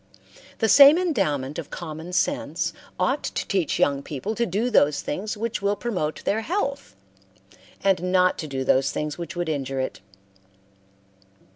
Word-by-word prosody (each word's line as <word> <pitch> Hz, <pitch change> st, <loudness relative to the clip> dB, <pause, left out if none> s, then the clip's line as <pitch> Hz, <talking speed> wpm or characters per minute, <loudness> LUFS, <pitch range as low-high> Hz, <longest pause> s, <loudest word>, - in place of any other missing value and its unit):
The 225 Hz, -, +1 dB
same 280 Hz, +6 st, +8 dB
endowment 155 Hz, -, -1 dB
of 160 Hz, -, -7 dB
common 160 Hz, +3 st, -7 dB
sense 170 Hz, -1 st, -1 dB, 0.3 s
ought 260 Hz, +10 st, +1 dB
to -, -, -3 dB
teach 185 Hz, -5 st, 0 dB
young 140 Hz, -1 st, +2 dB
people 150 Hz, +9 st, -4 dB
to 235 Hz, +1 st, -1 dB
do 215 Hz, +7 st, -1 dB
those 145 Hz, -8 st, +3 dB
things 210 Hz, +7 st, -4 dB
which 230 Hz, 0 st, -3 dB
will 200 Hz, +1 st, +1 dB
promote 180 Hz, -10 st, -3 dB
their 220 Hz, +2 st, +1 dB
health, 280 Hz, -, -3 dB, 0.9 s
and 180 Hz, -2 st, +1 dB
not 185 Hz, -1 st, +3 dB
to 155 Hz, -, -4 dB
do 135 Hz, -2 st, -3 dB
those 130 Hz, +1 st, +3 dB
things 150 Hz, +1 st, -4 dB
which 170 Hz, +1 st, -6 dB
would 175 Hz, -1 st, -2 dB
injure 135 Hz, -3 st, -2 dB
it. 130 Hz, -, -3 dB
180 Hz, 155 wpm, -24 LUFS, 150-220 Hz, 0.9 s, same